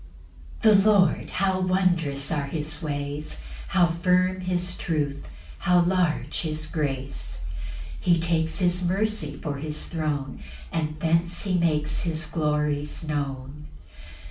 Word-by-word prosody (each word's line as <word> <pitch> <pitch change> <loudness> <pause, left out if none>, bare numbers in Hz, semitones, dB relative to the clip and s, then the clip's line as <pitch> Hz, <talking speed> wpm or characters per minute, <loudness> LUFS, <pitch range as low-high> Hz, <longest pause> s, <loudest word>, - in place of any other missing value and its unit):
1. 215 -3 +7
The 215 - +4
Lord, 185 -6 +3
how 190 -1 +1
wondrous 175 -7 +1
are 145 -3 0
his 150 +1 -3
ways: 145 -1 -4 0.3
How 185 -3 +4
firm 180 +2 +2
his 180 -1 -1
truth 145 -4 -2 0.3
how 180 -2 +4
large 175 -2 +1
his 155 -1 -2
grace; 135 - -3 0.6
He 175 -2 +3
takes 165 -1 +1
his 180 -1 +2
mercy 190 -5 0
for 145 -3 -3
his 150 +1 -3
throne, 150 -5 -2 0.3
And 155 -1 -2
thence 170 +2 +1
he 190 -3 0
makes 155 -3 +1
his 160 -1 0
glories 150 -1 -1
known. 140 0 -4
160 Hz, 125 wpm, -26 LUFS, 150-180 Hz, 0.6 s, 1